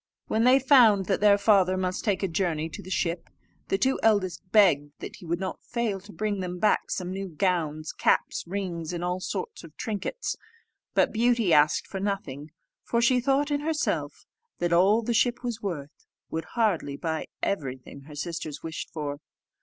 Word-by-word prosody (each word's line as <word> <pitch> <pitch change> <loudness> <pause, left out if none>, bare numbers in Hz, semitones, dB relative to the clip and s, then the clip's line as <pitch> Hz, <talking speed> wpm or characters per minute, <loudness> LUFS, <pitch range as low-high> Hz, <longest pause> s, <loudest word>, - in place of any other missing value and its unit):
When 225 +2 +1
they 255 +1 +7
found 240 -8 +5
that 195 - 0
their 205 -1 +6
father 195 -3 +4
must 185 0 -2
take 200 -3 0
a - - +2
journey 165 -3 -1
to - - -8
the 185 - -11
ship, 170 -2 -2 0.4
the 195 - +1
two 265 +6 +1
eldest 205 -5 +2
begged 150 -9 +4 0.2
he 175 - -12
would 170 +2 -1
not 190 -1 -5
fail 235 -5 -2
to 205 +3 -14
bring 210 -1 -2
them 180 -1 -4
back 210 +3 +2
some 180 -1 -3
new 195 +1 -4
gowns, 160 -3 -1
caps, - - +1
rings, 175 -3 -4
and 175 0 -3
all 180 +1 -1
sorts 450 - -5
of - - -14
trinkets. 220 - -3 0.6
But - - +3
Beauty 230 -5 +3
asked 150 +1 +4
for 195 - -6
nothing; 160 -8 -3 0.3
for 235 - 0
she 250 +2 +4
thought 275 +3 +1
in 290 - +1
herself 305 +1 -2 0.3
that 175 0 0
all 200 +6 +4
the 235 - -1
ship 240 +2 +1
was 235 -2 -3
worth 155 -8 -6 0.2
would 160 0 -3
hardly 190 -11 +1
buy 160 0 -3 0.2
everything 135 -6 -3
her 150 -1 -11
sisters 155 -1 -5
wished 160 -1 -5
for. 145 -2 -4
190 Hz, 180 wpm, -27 LUFS, 165-220 Hz, 0.6 s, they